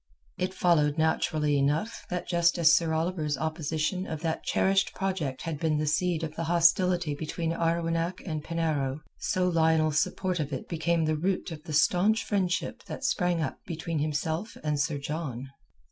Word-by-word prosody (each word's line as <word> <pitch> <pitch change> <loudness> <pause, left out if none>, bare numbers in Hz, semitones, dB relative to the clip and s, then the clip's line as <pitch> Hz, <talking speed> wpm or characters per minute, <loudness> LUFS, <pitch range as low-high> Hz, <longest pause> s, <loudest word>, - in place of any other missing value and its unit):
It 185 +1 -2
followed 150 -5 +3
naturally 155 -2 +1
enough 150 +11 0
that 180 -1 -3
just 170 -1 +2
as 165 -2 +6
Sir 165 -2 +3
Oliver's 160 -3 -1
opposition 160 +4 -2
of 160 -1 -5
that 165 -2 -2
cherished 195 0 +2
project 170 -9 -2
had 160 -3 -4
been 155 -1 +1
the 155 - 0
seed 165 +2 +1
of 155 -1 -4
the 165 - -3
hostility 175 -1 +3
between 160 +2 -3
Arwenack 165 +1 0
and 155 -4 -3
Penarrow, 155 -4 -1 0.2
so 185 -1 0
Lionel's 160 -3 +3
support 185 0 -1
of 150 -1 -2
it 135 - -5
became 165 0 0
the 155 0 +1
root 180 +3 -1
of 155 -2 -7
the 155 - -6
staunch 185 +8 +3
friendship 190 -4 -1
that - - -7
sprang 175 -2 +1
up - - -4
between 165 -1 -3
himself 160 +7 -2
and 150 -2 0
Sir 150 0 0
John. 140 -3 -4
160 Hz, 170 wpm, -28 LUFS, 155-175 Hz, 0.2 s, as